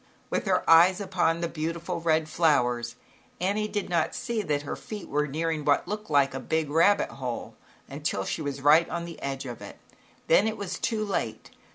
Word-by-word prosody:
With - - -1
her - - +1
eyes 175 +3 +7
upon 175 -4 0
the 170 - 0
beautiful 165 +2 -4
red 160 -1 +2
owers 125 -7 +2 0.4
Annie 205 +4 0
did 205 -2 -3
not 170 -2 0
see 235 -3 -2
that 145 -7 -1
her 145 - -4
feet 210 -3 -8
were 150 +1 0
nearing 160 +1 -2
what 145 +3 +2
looked 210 +2 -5
like 140 -2 +3
a 135 - -4
big 160 -1 -1
rabbit 170 +6 +4
hole, 125 -3 -5 0.3
until 140 -9 -3
she - - -3
was 140 -2 -4
right 155 +4 +5
on 170 +1 -3
the 170 -1 -10
edge 135 0 -4
of 120 -3 -7
it, - - -10 0.5
then 195 +6 +4
it 220 0 -2
was 200 -3 -5
too 215 -2 -1
late. 110 - -3
165 Hz, 195 wpm, -27 LUFS, 145-185 Hz, 0.5 s, eyes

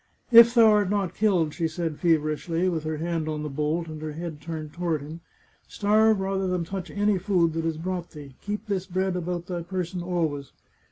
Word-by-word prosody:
" - - -38
If 235 +1 +2
thou 225 -2 +7
art 205 -3 +3
not 195 -3 -1
killed," 180 -8 +1
she 165 - -1
said 160 -1 -4
feverishly, 165 +1 +1
with 160 -3 -3
her 155 0 -2
hand 165 -1 -2
on 150 -1 -3
the 150 - -4
bolt 155 +4 -1
and 155 -1 -8
her 155 -1 -5
head 160 -1 -6
turned 155 -1 -6
toward 170 -4 -1
him, 160 +3 -9 0.3
" - - -36
starve 215 +1 +3
rather 190 0 -1
than 180 -2 -1
touch 185 +1 -6
any 205 -1 +1
food 175 -4 +1
that 165 0 -2
is 160 -1 -2
brought 175 +1 -4
thee. 145 -3 -11
Keep 205 +1 -4
this 190 -3 -2
bread 185 0 -1
about 175 -1 -3
thy 175 -1 -4
person 180 0 -4
always." 160 -6 -2
175 Hz, 215 wpm, -26 LUFS, 160-190 Hz, 0.3 s, thou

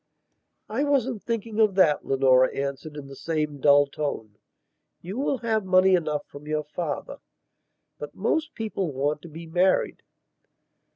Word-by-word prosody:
"I 230 +7 -1
wasn't 260 -6 0
thinking 230 -1 -3
of 215 -3 +4
that," 160 -6 +4
Leonora 130 -1 +4
answered 140 +2 -4
in 145 - -7
the 135 0 -11
same 150 -1 -2
dull 145 0 +6
tone. 140 -7 -5 0.6
"You 190 +8 -6
will 275 -1 0
have 220 -2 -1
money 185 0 +4
enough 155 -4 0
from 145 +1 -13
your 155 0 -1
father. 150 0 -5 0.8
But 150 - -8
most 305 +10 -1
people 210 -7 -3
want 145 +3 -1
to 170 - -11
be 165 +2 -9
married." 180 +3 +1
160 Hz, 150 wpm, -25 LUFS, 145-215 Hz, 0.8 s, dull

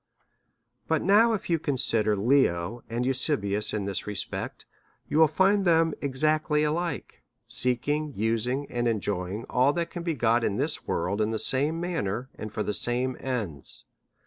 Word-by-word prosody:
But - - +1
now, 225 +4 +5
if 210 -1 -3
you 165 -2 +1
consider 115 -7 +1
Leo 115 -3 +1
and 120 +2 -2
Eusebius 125 -6 0
in 105 -2 -2
this 100 0 -3
respect, 105 -2 -4 0.4
you 155 - +1
will 160 - +7
find 195 +5 +3
them 165 -3 +3
exactly 150 +2 +1
alike, 160 +1 -3 0.2
seeking, 145 +5 -1
using, 115 +6 -1
and 120 0 -1
enjoying 105 -1 -2
all 130 +3 +3
that 170 0 -2
can 175 - -5
be 170 -2 -2
got 115 -1 +2
in 100 - 0
this 145 +4 -1
world, 95 +5 -1
in 105 - +1
the 110 - -1
same 145 +8 +1
manner 130 - -3
and 110 - -7
for 105 - -2
the 105 - -2
same 125 +4 +1
ends. 105 - -5
125 Hz, 160 wpm, -27 LUFS, 110-155 Hz, 0.4 s, will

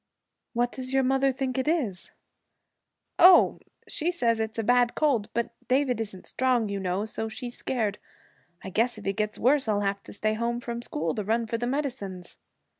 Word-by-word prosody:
'What 240 0 +1
does 255 0 -5
your 270 0 +3
mother 270 +1 +3
think 265 0 -2
it 260 - -2
is?' 255 - -1 1.1
'Oh, 360 0 +7 0.3
she 335 +3 -1
says 235 -10 +1
it's 220 0 -3
a 225 - 0
bad 245 +1 +3
cold; 265 -9 +1
but 235 0 0 0.2
David 255 -2 +2
isn't 200 -4 -6
strong, 250 -4 +1
you 200 0 -2
know, 190 +2 -1
so 220 0 -4
she's 240 +2 -6
scared. 215 -5 -2 0.6
I 190 - -6
guess 230 +4 +1
if 210 - -10
he 195 - 0
gets 215 +1 -2
worse 265 +1 +3
I'll 205 -1 +1
have 200 0 -1
to - - -12
stay 215 +1 0
home 235 +2 -1
from 235 -1 -5
school 160 -8 -2
to 210 - -3
run 225 +3 0
for 230 +1 -3
the 240 - -1
medicines.' 245 -10 -4
235 Hz, 190 wpm, -27 LUFS, 210-260 Hz, 1.1 s, Oh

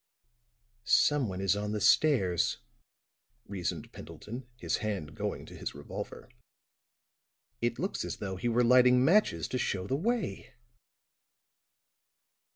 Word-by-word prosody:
"Someone 125 -12 +2
is 95 +1 +2
on 105 +1 -3
the 105 - -1
stairs," 100 - +3 0.9
reasoned 90 -6 -4
Pendleton, 120 +3 -9
his - - -1
hand 100 -9 -4
going - - -4
to - - -12
his - - -6
revolver. 70 - -7 1.3
"It 120 0 0
looks 190 - -2
as - - -5
though 95 -2 -4
he 120 +6 -1
were 120 +1 +3
lighting 125 +1 +6
matches 165 - +3
to 130 - -2
show 95 -5 -1
the 130 - -1
way." 220 - -2
115 Hz, 120 wpm, -30 LUFS, 95-130 Hz, 1.3 s, lighting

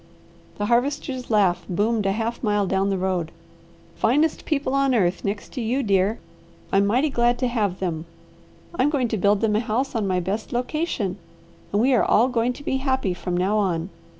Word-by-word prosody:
The 205 - -1
Harvester's 255 +2 0
laugh 200 -5 +2
boomed 210 +3 +1
a - - +2
half 225 +3 -2
mile 205 -2 +2
down 195 +1 +1
the 195 - 0
road. 180 -3 -1 0.6
"Finest 295 +7 +1
people 280 -4 -1
on 275 -2 +2
earth, 185 -4 +1
next 205 +1 -4
to 255 - -3
you, 245 +5 0
dear. 200 +1 +2 0.6
I'm 200 +1 +4
mighty 260 +8 +2
glad 240 -1 +2
to 255 - 0
have 210 -6 -1
them. 165 -4 -3 0.7
I'm 290 -4 +2
going 265 -5 0
to 220 - -1
build 200 +1 +2
them 215 -2 +2
a - - +3
house 240 +4 -1
on 220 -4 -1
my 185 -1 +1
best 200 +8 -3
location, 245 - -2 0.5
and 205 - +1
we 260 +4 +3
are 245 - +4
all 240 +4 +4
going 245 0 0
to 285 - -12
be 265 - 0
happy 265 -8 0
from 175 0 -3
now 195 +4 +1
on. 180 -2 -1
220 Hz, 195 wpm, -23 LUFS, 195-255 Hz, 0.7 s, I'm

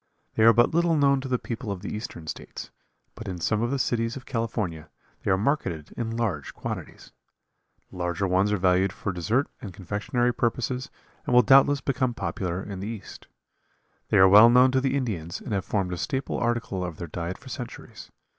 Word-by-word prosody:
They - - -1
are 115 - +9
but 120 +4 +3
little 170 0 +3
known 140 -2 +3
to 135 - -5
the 130 -1 +1
people 115 -2 -5
of 95 -1 -6
the 105 - -4
eastern 105 -6 -7
states, - - -7 0.4
but 115 -2 -9
in 90 -2 -4
some 105 +5 0
of 120 - 0
the 140 - 0
cities 115 -2 0
of 135 - -9
California 105 - -3 0.3
they - - -3
are 95 - +4
marketed 95 - -1
in 115 -1 -3
large 95 - -2
quantities. - - -7 0.8
The - - -11
larger 90 +1 -1
ones 95 +3 +2
are 105 - +2
valued 95 +1 +2
for 100 -1 -4
dessert 110 - 0
and 100 -7 -8
confectionery 105 +6 -1
purposes 125 +2 -1 0.4
and 125 - +2
will 125 - +7
doubtless 135 +3 +5
become 130 -3 -1
popular 90 -3 -3
in 100 -2 -7
the 100 - -5
East. 110 -3 -8 0.8
They - - +3
are 95 - +8
well 105 +4 +9
known 125 +2 +6
to 130 0 +2
the 135 +1 +1
Indians 95 - -3
and - - -6
have 100 -1 -1
formed 95 -4 -1
a - - -4
staple 130 +8 -2
article 115 -5 -1
of 85 -3 -5
their 85 - -6
diet 85 +4 -5
for 130 - -13
centuries. 125 -3 -8
110 Hz, 200 wpm, -26 LUFS, 95-125 Hz, 0.8 s, are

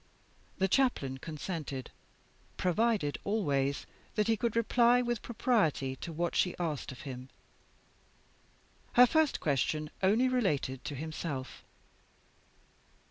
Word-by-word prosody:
The 190 - +2
Chaplain 180 - +1
consented; 155 -4 -5 0.7
provided 190 -4 +1
always 140 -10 0 0.3
that 210 -1 +2
he 225 - +3
could 230 +1 -1
reply 235 +1 +4
with 240 -2 -1
propriety 200 - +1
to 170 - -6
what 170 +2 -2
she 180 - +2
asked 155 -6 -3
of 130 - -10
him. 130 -1 -7 1.6
Her 250 - +9
first 315 +3 +2
question 150 +1 0
only 215 +7 +4
related 155 - 0
to 150 -1 -4
himself. 150 -2 -5
175 Hz, 110 wpm, -31 LUFS, 140-230 Hz, 1.6 s, Her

